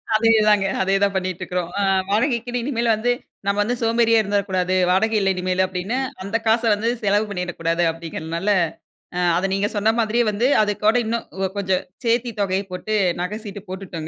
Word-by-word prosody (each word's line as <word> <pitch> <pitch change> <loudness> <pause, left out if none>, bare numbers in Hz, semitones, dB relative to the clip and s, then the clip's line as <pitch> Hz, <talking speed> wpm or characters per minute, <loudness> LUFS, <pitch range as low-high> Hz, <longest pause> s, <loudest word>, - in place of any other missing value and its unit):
அதேதாங்க, 215 -2 +4 0.2
அதேதான் 195 +1 +2
பண்ணிட்டு 185 -1 -2
இருக்கறோம். 180 -1 -3
அ - - +1 0.3
வாடகைக்குன்னு 240 +2 0
இனிமேல் 235 -3 +1
வந்து 240 +3 0 0.3
நம்ம 200 0 0
வந்து 240 +4 -1
சோம்பேறியா 230 0 +3
இருந்திரக்கூடாது. 195 -3 0
வாடகை 220 +5 +2
இல்ல 195 -1 +1
இனிமேல் 185 +1 0
அப்படின்னு, 185 +6 -3 0.3
அந்த 200 +3 -5
காசை 225 +1 +3
வந்து 220 +3 -1
செலவு 205 +1 +2
பண்ணிடக்கூடாது 175 -3 -2
அப்படிங்கிறதுனால, 165 +3 -4 0.7
அ - - -1 0.2
அத 185 - 0
நீங்க 195 +1 +1
சொன்ன 220 +2 +2
மாதிரியே 230 +2 +2
வந்து 210 +4 0 0.2
அதுக்கோட 210 +2 +1
இன்னும் 230 +1 -2 0.3
கொஞ்சம் 190 -2 0 0.2
சேர்த்தி 235 +1 +1
தொகைய 195 0 0
போட்டு 200 +4 -4 0.3
நகை 200 +4 -3
சீட்டு 205 -1 -7
போட்டுட்டோங்க. 180 -4 -6
200 Hz, 160 wpm, -21 LUFS, 185-225 Hz, 0.7 s, அதேதாங்க